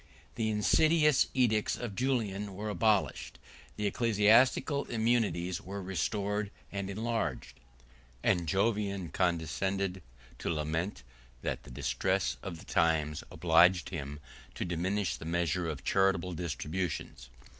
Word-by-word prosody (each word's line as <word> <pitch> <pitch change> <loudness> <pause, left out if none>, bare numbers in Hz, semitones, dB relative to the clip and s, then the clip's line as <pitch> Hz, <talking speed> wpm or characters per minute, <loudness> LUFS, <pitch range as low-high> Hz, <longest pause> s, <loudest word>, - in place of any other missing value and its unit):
The 110 -2 -1
insidious 150 +7 +4
edicts 110 -5 +2
of 120 -4 -5
Julian 105 -5 -1
were 105 +2 -4
abolished; 105 -1 +1 0.4
the 105 - -2
ecclesiastical 115 +6 +3
immunities 110 -7 0
were 100 +2 -6
restored 100 +2 -1 0.2
and 100 -1 -3
enlarged; 110 +2 -3 0.6
and 85 -2 +2
Jovian 100 -1 0
condescended 90 +3 -1 0.4
to - - -3
lament, 80 0 -2 0.4
that - - -2
the - - -14
distress - - -1
of 90 -4 -6
the 90 - -13
times 80 -4 +1
obliged 85 +2 +4
him 75 -4 -5 0.4
to - - -3
diminish 90 +3 -1
the - - -9
measure 85 0 0
of 70 -4 -5
charitable 95 +1 +2
distributions. 80 -4 -4
95 Hz, 115 wpm, -31 LUFS, 85-105 Hz, 0.6 s, insidious